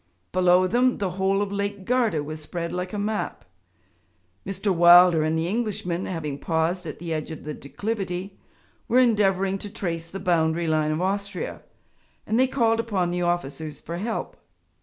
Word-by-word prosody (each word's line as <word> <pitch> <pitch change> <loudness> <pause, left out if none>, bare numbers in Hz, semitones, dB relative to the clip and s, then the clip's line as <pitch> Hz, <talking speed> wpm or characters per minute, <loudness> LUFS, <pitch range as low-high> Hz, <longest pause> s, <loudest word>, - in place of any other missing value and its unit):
Below 180 0 +4
them 245 +6 +2
the 195 -3 -2
whole 195 +2 +1
of 200 - -5
Lake 200 -1 -3
Garda 230 -11 +1
was 155 +1 -6
spread 170 +2 -4
like 180 +1 -3
a 210 - -4
map. 210 +1 -3 1.0
Mr. 195 0 0
Wilder 175 -1 +7
and 155 +1 +1
the 165 +1 0
Englishman, 190 -4 -2
having 155 -6 -4
paused 165 +2 -1
at - - -6
the 170 -1 -4
edge 155 0 -3
of 160 - -8
the 150 - -5
declivity, 190 - -4 0.5
were 245 - +2
endeavouring 195 -5 +3
to 205 - -6
trace 165 -4 -4
the 195 - -6
boundary 170 -2 +1
line 155 -1 +1
of 155 +3 -1
Austria, 200 - -3 0.6
and 220 +3 +1
they 260 - +5
called 230 -4 +2
upon 195 -6 0
the 180 0 -1
officers 160 -3 -2
for 170 +2 -6
help. 220 +5 -4
180 Hz, 170 wpm, -25 LUFS, 165-205 Hz, 1.0 s, Wilder